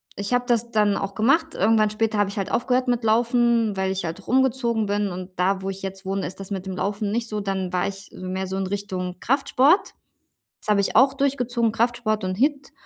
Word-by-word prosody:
ich 200 +3 -5
habe 245 0 +2
das 235 -1 +1
dann 210 -2 +3
auch 195 0 -4
gemacht. 300 - +2
Irgendwann 215 +1 +3
später 215 0 -1
habe 205 -1 +2
ich 200 - -8
halt 195 - -2
aufgehört 250 +1 +1
mit 245 -1 0
Laufen, 235 -1 +2
weil 190 0 0
ich 190 -2 -3
halt 165 +4 -6
rumgezogen 245 -3 +1
bin, 205 0 0
und 185 0 -6
da, 190 +1 +1
wo 195 - -2
ich 195 - -9
jetzt 195 0 -7
wohne, 195 0 -2
ist 185 - -10
das 195 +1 -9
mit 190 -1 -4
dem 190 - -4
Laufen 205 +1 -2
nicht 230 +1 -1
so. 210 -1 -3
Dann 190 -2 -3
war 180 - +1
ich 195 0 -8
so - - -10
mehr 190 +1 -3
so 190 - -4
in 195 -1 -2
Richtung 185 -2 -4
Kraftsport, 275 - +2 0.7
das - - -16
habe 205 -1 +4
ich 200 - -1
auch 265 +3 +6
durchgezogen: 250 -4 0
Kraftsport 225 -2 0
und 185 0 -2
HIIT. 280 +3 0
210 Hz, 230 wpm, -23 LUFS, 195-240 Hz, 0.7 s, auch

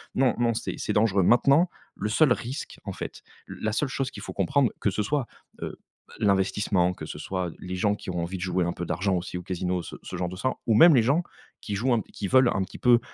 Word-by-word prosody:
non, 130 -2 +3
non 120 -1 +2
c'est - - -3
c'est - - -2
dangereux. 105 -3 +3
Maintenant, 140 - +5 0.3
le 105 - -3
seul 135 +4 +4
risque 125 +4 -6
en - - -5
fait, - - -7 0.3
la 110 - -3
seule 135 +7 0
chose 130 +1 -2
qu'il - - -9
faut - - -6
comprendre, 140 -4 +2
que - - +2
ce 105 - -1
soit, 140 +4 0 0.4
heu, - - -6 0.4
l'investissement, 100 -2 +2
que - - -8
ce - - -7
soit 90 -2 -3
les 90 0 -5
gens 105 +2 +2
qui 105 - -9
ont 90 -1 -2
envie 90 +3 -4
de - - -8
jouer 90 -1 0
un 85 - -1
peu 90 - -5
d'argent 95 +3 0
aussi 90 0 -3
au 90 - -6
casino, 90 0 -2
ce - - -8
ce - - -6
genre 90 0 -1
de 90 - -7
ça 130 +8 0 0.2
ou 115 - +4
même 160 +7 +8
les 120 - +5
gens 145 +9 +2 0.4
qui 105 - -4
jouent 120 +5 +1
un 115 - +2
qui 100 - -4
veulent 130 +2 +5
un 95 - 0
petit 95 - -10
peu 120 -1 +5
105 Hz, 250 wpm, -26 LUFS, 90-125 Hz, 0.4 s, même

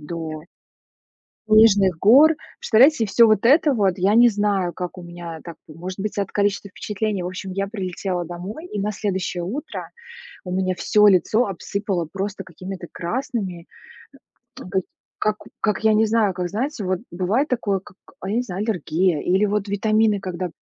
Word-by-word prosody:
до 155 0 -6 1.0
снежных 205 -5 +5
гор. 275 - +7 0.3
Представляете, 240 +1 +4
всё 230 +3 +5
вот 215 -2 +3
это 290 +4 +5
вот, 195 -5 +2
я 195 +3 +2
не 240 +1 +7
знаю, 200 -4 0
как 180 0 -6
у - - -8
меня 170 -2 -8
так, 170 -2 -9
может 180 +5 -8
быть, 210 +1 -4
от 200 -1 -1
количества 200 -1 -1
впечатлений. 210 -1 -3
В - - -4
общем, 185 +1 -6
я 195 +1 -2
прилетела 185 -3 -3
домой, 185 - -7
и 210 - -6
на 210 +1 -1
следующее 190 -3 -3
утро 265 - -6 0.5
у 180 - -7
меня 185 0 0
всё 210 +3 +4
лицо 205 +5 +3
обсыпало 195 -2 -3
просто 195 +1 -4
какими-то 185 +1 -8
красными, 195 -3 -4 1.0
э, - - -7
то 185 +1 -1
есть 190 - -3 0.3
как 215 0 0 0.2
как, 210 -2 0
я 220 -1 +4
не 220 +1 +4
знаю, 215 -4 +2
как, 180 -1 -3
знаете, 230 - -3
вот 185 -1 -1
бывает 195 - 0
такое, 205 -6 -1
как, 195 0 -17 0.2
а, 190 - -6
я 215 - -1
не 245 - +2
знаю, 195 -4 -5
аллергия 175 -3 0
или, 190 +4 +2
вот, 205 0 -1
витамины, 215 0 +2
когда 180 -1 -4
195 Hz, 175 wpm, -22 LUFS, 180-215 Hz, 1.0 s, гор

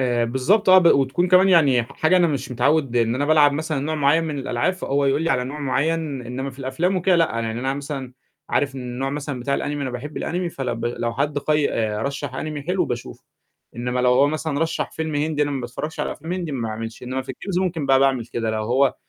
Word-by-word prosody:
آآ، 120 -2 +1
بالضبط 150 - +1
آه، 185 0 +9
ب 180 - +3
وتكون 140 +4 +3
كمان 185 +1 +6
يعني 145 -9 +5
ح 115 - -12
حاجة 160 +4 +2
أنا 175 -1 +4
مش 140 -5 -3
متعوّد 135 +1 +1
إن 115 -1 +2
أنا 135 +3 0
بالعب 150 -2 +5
مثلًا 155 0 -2
نوع 155 +3 -2
معيّن 150 +2 +3
من 150 -3 -3
الألعاب، 125 +3 0
فهو 145 -6 -1
يقول 140 +3 +2
لي 165 - 0
على 125 -4 +1
نوع 140 +4 -6
معيّن، 145 0 -1
إنّما 130 +3 -4
في 130 - -16
الأفلام 140 +8 -1
وكده 185 0 +3
لأ، 165 - +5 0.2
يعني 115 +1 -3
أنا 135 +1 -1
مثلًا 140 -2 -6 0.4
عارف 140 -1 +1
إن 135 - -6
النوع 125 +2 -3
مثلًا 140 -2 -4
بتاع 140 +3 0
الAnime - - -3
أنا 145 -2 -3
باحب 125 +5 -6
الAnime، 175 +1 -2
فلو 130 -3 -2
ب 115 0 -5
لو 120 0 -2
حد 145 +2 0
قي 150 0 +1
آآ 105 -1 -1
رشّح 140 0 -3
Anime 150 -2 -5
حلو 180 0 +1
باشوفه، 120 -4 -6 0.5
إنّما 125 +1 -1
لو 125 0 +4
هو 135 +3 +5
مثلًا 155 0 -2
رشّح 165 0 -1
فيلم 160 -1 -4
هندي 150 0 0
أنا 145 - 0
ما 140 -2 -2
باتفرّجش 125 +6 -5
على - - -2
أفلام 160 +4 -7
هندي 175 -4 -3
ما 120 -4 -2
باعملش، 110 +1 -6
إنّما 130 +1 -3
في 130 0 -6
الGames 185 +3 -3
ممكن 165 -6 -2
بقى 135 -1 +5
باعمل 135 -4 +2
كده 115 -2 -2
لو 110 0 -2
هو 130 +4 +2
140 Hz, 240 wpm, -22 LUFS, 125-155 Hz, 0.5 s, آه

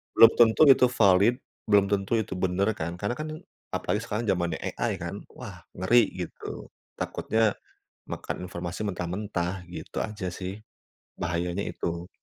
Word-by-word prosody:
belum 115 - +9
tentu 115 +5 +6
itu 130 -1 +7
valid, 100 0 +5 0.3
belum 100 -1 +6
tentu 100 +2 0
itu 105 -4 -2
bener 95 +4 +1
kan, 85 +2 -3
karena 120 - -2
kan 155 0 -4 0.5
apalagi 105 - -1
sekarang 110 +2 -2
zamannya 85 -3 0 0.2
AI, - - 0
kan, - - -5
wah - - -9 0.2
ngeri, 115 +6 +4 0.2
gitu. - - -9 0.3
Takutnya 110 -2 0 0.5
makan 90 - -5
informasi 85 +3 -5
mentah-mentah, 90 0 -3
gitu - - -5
aja 105 -4 -4
sih. 95 +2 -5 0.6
Bahayanya 85 +3 -2
itu. 85 0 -4
95 Hz, 135 wpm, -27 LUFS, 90-110 Hz, 0.6 s, belum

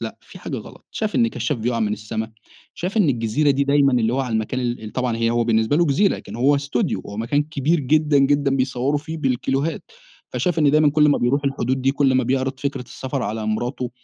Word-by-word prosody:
لأ - - -6
فيه - - -14
حاجة - - -5
غلط، - - -13
شاف 215 -1 -3
إن 235 -1 +3
كشّاف 150 - -2
بيقع 115 +1 -1
من 105 -1 0
السما، 110 +1 -5 0.4
شاف 185 +5 -4
إن 195 -8 +4
الجزيرة 120 +4 +1
دي 140 0 +2
دايمًا 140 -1 +3
اللي 120 -1 +2
هو 135 - 0
على 125 -4 -3
المكان 110 +4 -1
ال 120 -2 -3
ال 105 - -8
طبعًا 125 -3 -1
هي 115 0 +1
هو 120 0 +1
بالنسبة 110 +3 +2
له 170 +1 +3
جزيرة 170 +9 +2
لكن 105 +3 -9
هو 140 +4 +3
استوديو، 140 -8 -1
هو 100 - -8
مكان 130 +7 0
كبير 155 +2 0
جدًا، 150 +1 +2
جدًا، 140 0 +2
بيصوروا 130 +2 0
فيه 160 +2 -7
بالكيلوهات، 135 +3 -1 0.5
فشاف 175 -2 -1
إن 145 -2 +4
دايمًا 150 0 +4
كل 150 0 +4
ما 145 - +3
بيروح 140 +4 +1
الحدود 130 -1 -1
دي 135 +1 +2
كل 140 -2 +2
ما 130 -1 +2
بيعرض 130 +1 -1
فكرة 140 -2 -3
السفر 130 +2 -5
على 110 0 -3
مراته 120 +3 -2
135 Hz, 225 wpm, -21 LUFS, 120-145 Hz, 0.5 s, إن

